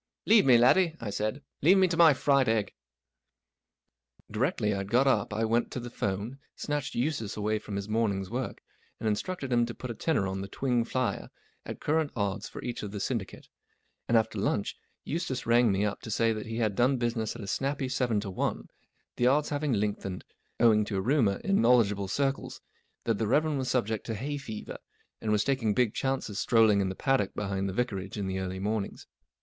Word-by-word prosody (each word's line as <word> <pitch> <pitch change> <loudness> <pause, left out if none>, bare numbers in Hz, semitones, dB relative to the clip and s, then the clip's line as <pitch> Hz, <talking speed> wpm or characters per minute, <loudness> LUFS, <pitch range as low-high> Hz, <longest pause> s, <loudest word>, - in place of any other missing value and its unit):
44 220 - +5
Leave 215 - +6
me, 125 -2 +8
laddie," 160 +8 +4
I 110 -3 -4
said. 110 +8 -2
" - - -53
Leave 180 +7 +6
me 190 -1 +5
to 170 - -1
my 165 -1 +7
fried 140 -2 +3
egg." 110 -3 0 1.6
D 105 - -5
irectly 120 - +1
rd 95 0 -4
got 125 +5 +4
up 110 -8 +2
i 110 +2 0
went 115 +2 +1
to - - -3
the 120 0 -7
'phone, 105 +6 -3 0.2
snatched 145 -2 -3
Eustace 120 -5 -2
away 105 +1 0
from 105 -1 -7
his 100 0 -3
morning's 105 -3 0
work, 125 +1 -4 0.4
and 110 - -2
instructed 135 - -2
him 120 0 +4
to 120 - -6
put 125 - -6
a - - -3
tenner 140 -2 0
on 95 0 -3
the 100 - -5
Twing 120 +3 0
flier 130 0 -2 0.4
at - - -6
current 155 0 +1
odds 100 -2 -2
for - - -9
each 120 -1 -4
of 105 - -5
the 105 - -6
syndi¬ 105 0 -2
cate; - - -14 0.6
and 115 - +4
after 110 -1 0
lunch 100 0 -1 0.3
Eustace 150 -5 -3
rang 120 -1 +4
me 100 +2 +1
up 105 - -3
to - - -8
say 115 +1 +2
that 110 0 -6
he 115 0 -4
had 110 -3 +1
done 130 +4 +3
business 120 -2 -1
at 115 - -7
a - - -7
snappy 135 +5 -1
seven 125 -4 0
to 100 -2 -5
one, 90 - -2 0.5
the 120 - +3
odds 145 +3 +3
having 145 -1 -1
lengthened 100 -3 -2 0.4
owing 110 -3 +5
to 105 -1 -3
a - - 0
rumour 115 -4 +2
in 195 0 +2
know¬ 125 +2 +6
ledgeable 100 -3 0
circles 135 +4 -1 0.4
that 115 -3 0
the 110 - 0
Rev. 145 +7 +3
was 130 -2 -2
subject 110 -4 -1
to 115 - -2
hay 145 +7 -3
fever, 110 -6 -7 0.4
and 110 - -1
was 105 -1 +3
taking 125 -7 0
big 125 -4 +2
chances 130 -6 -2
strolling 110 -4 +4
in 95 - 0
the 95 - -5
paddock 135 -6 0
behind 100 -1 -2
the - - -2
Vicarage 100 -4 -3
in 100 - -2
the 95 0 -2
early 95 0 -4
mornings. 105 +1 -3
115 Hz, 215 wpm, -29 LUFS, 105-130 Hz, 1.6 s, me